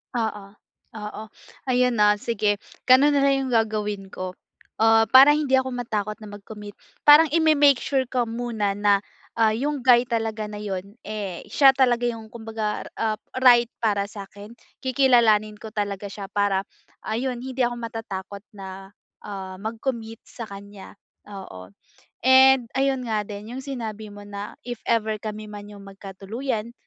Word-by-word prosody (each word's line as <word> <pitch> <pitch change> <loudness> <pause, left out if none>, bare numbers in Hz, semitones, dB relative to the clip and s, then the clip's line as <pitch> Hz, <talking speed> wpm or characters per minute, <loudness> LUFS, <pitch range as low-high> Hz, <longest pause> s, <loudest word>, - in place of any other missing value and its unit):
Oo, 220 -3 -2 0.5
oo. 210 0 -7 0.4
Ayun 250 -1 +2
no, 210 0 +5
sige 210 -1 0 0.3
ganun 265 +3 +6
nalang 275 -1 +2
yung - - -4
gagawin 210 -3 -1
ko. 185 -1 -6 0.5
Ah, 225 -1 +4
para 270 +4 +8
hindi 290 -3 +2
ako 260 -1 -1
matakot 215 -4 -3
na 215 - -9
mag-commit. 205 0 -11 0.2
Parang 295 +2 +8
i-me-make 300 -5 +4
sure 270 -2 0
ko 245 -2 -1
muna 225 -4 -2
na, 205 -1 +3 0.3
ah, 225 -1 +4
yung 275 +6 -2
guy 245 -1 +5
talaga 225 -3 -2
na 210 0 -7
yun, 200 -1 -5
eh, 205 -4 -5
siya 270 +4 +6
talaga 245 -2 +2
yung 225 -2 -4
kumbaga, 220 -2 -4
ah, 220 -1 -1 0.2
right 240 -2 +6
para 205 -3 +1
sakin. 200 +1 -11 0.3
Kikilalanin 235 -5 +3
ko 215 0 -10
talaga 205 -1 -3
siya 195 0 -8
para 200 -2 +1 0.4
ayun 240 +2 -3
hindi 260 0 -7
ako 240 - -2
matatakot 220 -4 -7
na, 195 0 -10 0.3
ah, 190 -2 -7
mag-commit 225 +2 -5
sakanya, 200 -3 -10 0.3
oo. 100 - -10 0.5
And 260 0 +6
ayun 265 -1 0
nga 220 -3 -1
din 210 +2 -8
yung 265 - -6
sinabi 225 -6 -6
mo 205 0 -11
na 205 0 -7
if 240 -2 -5
ever 220 -2 +1
kami 215 0 -6
man 205 0 -9
yung 205 -1 -12
magkatuluyan, 210 +5 -5
220 Hz, 145 wpm, -24 LUFS, 205-245 Hz, 0.5 s, para